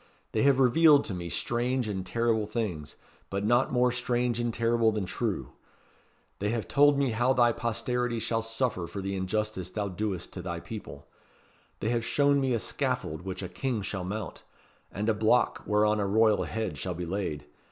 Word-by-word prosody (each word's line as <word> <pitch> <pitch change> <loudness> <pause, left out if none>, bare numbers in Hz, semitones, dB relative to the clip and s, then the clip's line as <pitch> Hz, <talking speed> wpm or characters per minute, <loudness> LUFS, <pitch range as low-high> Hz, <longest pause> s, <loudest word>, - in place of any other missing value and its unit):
They 110 - 0
have 140 -1 +4
revealed 145 +3 +6
to 100 - -3
me 85 -1 -5
strange 120 - -1
and 95 -3 -3
terrible 115 0 0
things 105 -10 -3 0.3
but 100 +1 -2
not 120 +4 +3
more 125 0 +3
strange 120 -1 0
and 120 0 0
terrible 115 0 +2
than 105 -3 -2
true. 90 - -3 0.9
They 105 - 0
have 115 -1 -2
told 145 0 +5
me 140 -3 +1
how 120 +4 +2
thy 120 -2 +4
posterity 120 +1 -1
shall 115 0 -1
suffer 115 -5 -1
for 90 +4 -6
the 95 0 -3
injustice 95 -1 -2
thou 100 +1 -3
doest 95 -1 -3
to 90 - -5
thy 85 -1 -4
people. 110 +4 -9 0.8
They 110 - 0
have 120 -1 0
shown 140 +3 +3
me 130 -2 +1
a - - +2
scaffold 80 -6 -2
which 95 +1 -5
a - - -3
King 110 +4 -2
shall 95 -1 -3
mount 105 +4 -5 0.5
and 105 +3 -3
a 110 - +4
block 110 +3 +2
whereon 105 0 +3
a 100 - 0
royal 110 +1 +3
head 110 -3 -3
shall 90 -2 -3
be 90 +1 -4
laid. 85 -5 -3
110 Hz, 185 wpm, -28 LUFS, 95-120 Hz, 0.9 s, revealed